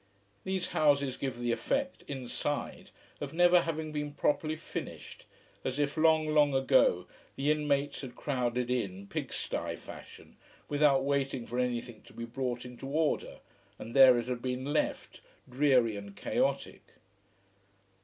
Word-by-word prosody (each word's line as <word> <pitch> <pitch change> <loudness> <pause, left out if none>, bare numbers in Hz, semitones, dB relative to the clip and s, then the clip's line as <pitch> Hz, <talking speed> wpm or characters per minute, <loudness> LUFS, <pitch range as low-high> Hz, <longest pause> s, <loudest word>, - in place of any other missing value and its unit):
These 190 -1 -2
houses 140 -3 +2
give 130 -3 -4
the 120 0 -1
effect, 275 - -1
inside, 140 +2 -4 0.3
of 145 0 -5
never 175 0 +6
having 160 -2 -3
been 150 -1 -3
properly 155 +2 +1
finished, 155 - -8 0.4
as 130 +1 -2
if, 145 -1 0
long, 160 -1 +4
long 150 -2 +4
ago, 135 - +4 0.3
the 145 +2 +1
inmates 145 -2 0
had 130 -3 -8
crowded 125 -3 -1
in, 100 -6 -2
pig - - -4
sty - - -3
fashion, - - -12 0.3
without 145 -2 +3
waiting 135 -3 -1
for 120 +2 -3
anything 120 -2 -2
to - - -15
be 115 - -6
brought 125 0 -3
into 125 +2 -8
order, 155 +2 -1 0.4
and 115 - -8
there 130 -2 +8
it 120 - -1
had 125 -1 -3
been 130 +1 -3
left, 155 - -2 0.3
dreary 125 -4 +3
and 100 0 -8
chaotic. - - -1
135 Hz, 145 wpm, -31 LUFS, 125-150 Hz, 0.4 s, there